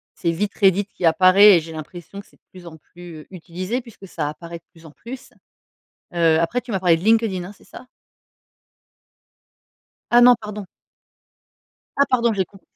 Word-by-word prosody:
c'est 170 Hz, -3 st, -2 dB
vite 200 Hz, +4 st, -3 dB
Reddit 195 Hz, 0 st, +2 dB
qui 190 Hz, -3 st, -6 dB
apparaît 185 Hz, +4 st, +6 dB
et -, -, +1 dB
j'ai 165 Hz, +1 st, -10 dB
l'impression 175 Hz, +5 st, -10 dB
que -, -, -25 dB
c'est -, -, -26 dB
de -, -, -62 dB
plus 180 Hz, -2 st, -14 dB
en 160 Hz, -1 st, -12 dB
plus, 170 Hz, +1 st, -13 dB
heu, -, -, -19 dB
utilisé 185 Hz, +7 st, -5 dB
puisque 225 Hz, -5 st, -15 dB
ça 155 Hz, -4 st, -4 dB
apparaît 170 Hz, +2 st, -10 dB
de -, -, -49 dB
plus 165 Hz, -1 st, -20 dB
en 160 Hz, -, -13 dB
plus. 255 Hz, -, -11 dB, 0.8 s
Heu, 165 Hz, -2 st, +2 dB
après 170 Hz, +9 st, -1 dB
tu 250 Hz, -, -12 dB
m'as 190 Hz, -, -2 dB
parlé 175 Hz, -3 st, +3 dB
de -, -, -11 dB
LinkedIn, 220 Hz, -5 st, +1 dB
hein, 190 Hz, -, -10 dB
c'est -, -, -23 dB
ça? -, -, -14 dB, 2.2 s
Ah 240 Hz, 0 st, +5 dB
non, 245 Hz, 0 st, +7 dB
pardon. 210 Hz, -1 st, -8 dB, 1.3 s
Ah 280 Hz, -, +3 dB
pardon, 235 Hz, -2 st, +1 dB
j'ai 190 Hz, -2 st, -1 dB
comp 195 Hz, +2 st, -20 dB
185 Hz, 190 wpm, -20 LUFS, 170-210 Hz, 2.2 s, non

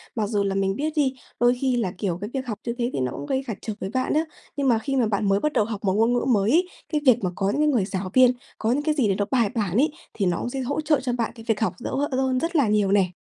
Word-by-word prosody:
Mặc 215 Hz, -3 st, 0 dB
dù 205 Hz, -2 st, +1 dB
là 195 Hz, -1 st, -1 dB
mình 195 Hz, 0 st, +1 dB
biết 305 Hz, +5 st, -2 dB
đi, 280 Hz, -4 st, +2 dB, 0.3 s
đôi 245 Hz, +1 st, +4 dB
khi 260 Hz, -2 st, +2 dB
là, 210 Hz, -6 st, 0 dB
kiểu, 180 Hz, -3 st, -2 dB
cái 205 Hz, -, -4 dB
việc 265 Hz, -1 st, -3 dB
học 215 Hz, -3 st, -4 dB
như 235 Hz, -, -1 dB
thế 240 Hz, -1 st, 0 dB
thì -, -, -2 dB
nó 130 Hz, -1 st, -1 dB
cũng 140 Hz, -, -6 dB
gây 265 Hz, -, -1 dB
cản 220 Hz, -, -4 dB
trở 220 Hz, -, -4 dB
với 190 Hz, -, -4 dB
bạn 255 Hz, 0 st, 0 dB
á, 310 Hz, -, +3 dB, 0.3 s
nhưng 280 Hz, -1 st, 0 dB
mà 235 Hz, -3 st, +4 dB
khi 275 Hz, +4 st, -2 dB
mà 245 Hz, -4 st, +2 dB
bạn 205 Hz, -1 st, 0 dB
mới 195 Hz, 0 st, +3 dB
bắt 300 Hz, +6 st, -1 dB
đầu 210 Hz, -, +2 dB
học 215 Hz, -1 st, -6 dB
một 190 Hz, -2 st, +2 dB
ngôn 225 Hz, +4 st, +3 dB
ngữ 245 Hz, -, 0 dB
mới 205 Hz, +1 st, +2 dB
ấy, 350 Hz, +5 st, +3 dB, 0.3 s
cái 300 Hz, -, +1 dB
việc 245 Hz, -4 st, +5 dB
mà 185 Hz, -, +1 dB
có 195 Hz, -, -1 dB
những 280 Hz, +9 st, 0 dB
cái 305 Hz, -, +3 dB
người 245 Hz, -10 st, +2 dB
giáo 190 Hz, -1 st, -4 dB
viên, 255 Hz, -1 st, +7 dB, 0.3 s
có 225 Hz, -, 0 dB
những 285 Hz, +4 st, 0 dB
cái 305 Hz, 0 st, +1 dB
gì 265 Hz, -7 st, +2 dB
để 195 Hz, -, +1 dB
nó 205 Hz, +1 st, 0 dB
bài 235 Hz, -6 st, +3 dB
bản 205 Hz, -5 st, -1 dB
ấy, 295 Hz, +5 st, +3 dB, 0.2 s
thì 200 Hz, -, -1 dB
nó 175 Hz, -2 st, +1 dB
cũng -, -, -3 dB
sẽ 270 Hz, -, -4 dB
hỗ 280 Hz, +4 st, -2 dB
trợ 300 Hz, -2 st, +2 dB
cho 255 Hz, -1 st, -2 dB
bạn 235 Hz, -2 st, -1 dB
cái 225 Hz, -, -11 dB
việc 220 Hz, -2 st, +1 dB
học 220 Hz, -, 0 dB
dỡ -, -, -5 dB, 0.2 s
ơn 260 Hz, -1 st, +1 dB
rất 335 Hz, +4 st, -2 dB
là 280 Hz, -7 st, +4 dB
nhiều 210 Hz, -2 st, +2 dB
nè. 195 Hz, -2 st, +4 dB
235 Hz, 330 wpm, -24 LUFS, 200-265 Hz, 0.3 s, viên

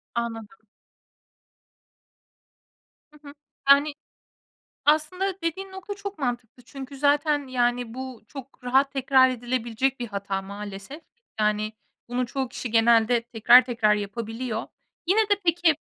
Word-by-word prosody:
Anladım. 225 Hz, -2 st, -3 dB, 2.6 s
Hı 300 Hz, -, -19 dB
hı. 285 Hz, -, -10 dB, 0.4 s
Yani, 285 Hz, +1 st, +6 dB, 0.9 s
aslında 335 Hz, +6 st, +2 dB
dediğin 380 Hz, +4 st, -3 dB
nokta 380 Hz, +2 st, -7 dB
çok 400 Hz, -2 st, -7 dB
mantıklı. 245 Hz, -2 st, -4 dB
Çünkü 275 Hz, +2 st, -9 dB
zaten, 290 Hz, +1 st, +2 dB
yani, 245 Hz, -2 st, 0 dB
bu 260 Hz, -2 st, -7 dB
çok 275 Hz, -2 st, -11 dB
rahat 270 Hz, +3 st, +2 dB
tekrar 265 Hz, -1 st, +4 dB
edilebilecek 245 Hz, +1 st, -2 dB
bir 240 Hz, -, -2 dB
hata 200 Hz, -1 st, -3 dB
maalesef. 200 Hz, +8 st, -8 dB, 0.4 s
Yani, 210 Hz, 0 st, +1 dB, 0.4 s
bunu 245 Hz, +1 st, -1 dB
çoğu 265 Hz, +1 st, -3 dB
kişi 245 Hz, -1 st, -6 dB
genelde 230 Hz, +1 st, +4 dB
tekrar 240 Hz, +2 st, +6 dB
tekrar 230 Hz, -4 st, +2 dB
yapabiliyor. 225 Hz, +3 st, -4 dB, 0.4 s
Yine 395 Hz, +5 st, +4 dB
de 410 Hz, -2 st, +2 dB
peki, 335 Hz, -1 st, +3 dB
255 Hz, 115 wpm, -25 LUFS, 230-290 Hz, 2.6 s, Yani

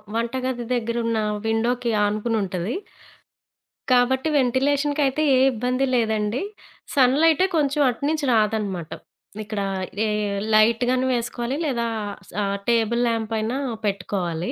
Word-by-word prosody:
వంట 230 Hz, +1 st, -1 dB
గది 245 Hz, -2 st, -2 dB
దగ్గర 235 Hz, -1 st, -2 dB
ఉన్న 230 Hz, -1 st, 0 dB, 0.3 s
విండోకి 235 Hz, +2 st, 0 dB
ఆనుకుని 215 Hz, +2 st, -1 dB
ఉంటది. 185 Hz, -, -3 dB, 1.2 s
కాబట్టి 255 Hz, +3 st, +3 dB
వెంటిలేషన్‌కి 280 Hz, +3 st, +1 dB
అయితే 270 Hz, +3 st, 0 dB
ఏ -, -, +4 dB
ఇబ్బంది 250 Hz, +3 st, 0 dB
లేదండి, 220 Hz, -1 st, 0 dB, 0.5 s
సన్ 260 Hz, -2 st, +5 dB
లైటే 325 Hz, +2 st, +4 dB
కొంచెం 290 Hz, -1 st, +1 dB
అటునుంచి 285 Hz, +5 st, -1 dB
రాదనమాట. 210 Hz, -6 st, 0 dB, 0.5 s
ఇక్కడ 210 Hz, -1 st, -4 dB, 0.5 s
ఏ -, -, 0 dB, 0.4 s
లైట్‌ 220 Hz, +2 st, +4 dB
గాని 255 Hz, 0 st, +1 dB
వేసుకోవాలి, 240 Hz, +1 st, -2 dB
లేదా 240 Hz, -5 st, -1 dB, 0.4 s
స -, -, -16 dB, 0.4 s
టేబుల్ 235 Hz, 0 st, +2 dB
ల్యాంప్ 225 Hz, -1 st, -1 dB
అయినా 225 Hz, +4 st, -2 dB, 0.3 s
పెట్టుకోవాలి. 180 Hz, -4 st, -2 dB
235 Hz, 120 wpm, -23 LUFS, 215-260 Hz, 1.2 s, సన్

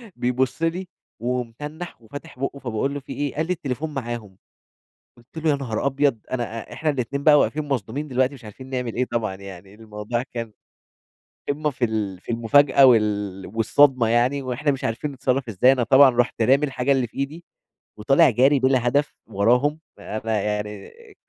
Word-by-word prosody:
بيبُصّ 125 Hz, +4 st, -1 dB
لي 175 Hz, +3 st, -1 dB, 0.3 s
ومتنّح 125 Hz, +7 st, -5 dB
وفاتح 145 Hz, +5 st, -11 dB
بُقُّه 140 Hz, +1 st, -3 dB
فباقول 125 Hz, +2 st, -2 dB
له: 145 Hz, -, -4 dB
"في 135 Hz, -, -9 dB
إيه؟" 145 Hz, -2 st, -3 dB
قال 155 Hz, -, 0 dB
لي: 180 Hz, -, +1 dB
"التليفون 150 Hz, -1 st, -4 dB
معاهم"، 120 Hz, -7 st, -6 dB, 0.8 s
قُلت 120 Hz, +6 st, -19 dB
له: 160 Hz, 0 st, 0 dB
"يا 145 Hz, -, +3 dB
نهار 125 Hz, -5 st, -3 dB
أبيض"، 140 Hz, -3 st, +1 dB
أنا 120 Hz, -2 st, -3 dB
إ -, -, -9 dB
إحنا 155 Hz, -, -1 dB
الاتنين 140 Hz, 0 st, -2 dB
بقى 150 Hz, -1 st, +7 dB
واقفين 150 Hz, +1 st, 0 dB
مصدومين 135 Hz, +2 st, -3 dB
دلوقتي 130 Hz, 0 st, +1 dB
مش 130 Hz, -3 st, -13 dB
عارفين 130 Hz, +5 st, -11 dB
نعمل 125 Hz, -3 st, -3 dB
إيه 125 Hz, -, +1 dB
طبعًا، 110 Hz, -5 st, -1 dB
يعني 95 Hz, 0 st, -11 dB
الموضوع 110 Hz, +2 st, -4 dB
كان 115 Hz, -2 st, -5 dB, 1.0 s
قمّة 150 Hz, +2 st, 0 dB
في 130 Hz, -3 st, -1 dB
ال 105 Hz, -5 st, -3 dB
في -, -, -6 dB
المفاجأة 135 Hz, +4 st, +5 dB
وال 105 Hz, -5 st, +2 dB
والصدمة 125 Hz, +2 st, +3 dB
يعني، 120 Hz, +5 st, +2 dB
وإحنا 130 Hz, +3 st, -1 dB
مش 135 Hz, -, -5 dB
عارفين 115 Hz, +6 st, -2 dB
نتصرّف 130 Hz, -1 st, -1 dB
ازاي، 115 Hz, +5 st, +4 dB
أنا 130 Hz, -2 st, +1 dB
طبعًا 135 Hz, +4 st, +7 dB
رُحت 120 Hz, -1 st, 0 dB
رامي 135 Hz, +6 st, +4 dB
الحاجة 135 Hz, -1 st, -1 dB
اللي 130 Hz, -3 st, +2 dB
في -, -, -18 dB
إيدي، 150 Hz, +5 st, -4 dB, 0.5 s
وطالع 135 Hz, +6 st, +4 dB
جاري 135 Hz, +4 st, +3 dB
بلا 130 Hz, -2 st, +2 dB
هدف 145 Hz, +4 st, 0 dB
وراهم 125 Hz, +10 st, +1 dB, 0.2 s
فأنا 110 Hz, 0 st, -3 dB
يعني 105 Hz, -1 st, -4 dB
آآ، 460 Hz, -3 st, -18 dB
125 Hz, 180 wpm, -23 LUFS, 115-140 Hz, 1.0 s, بقى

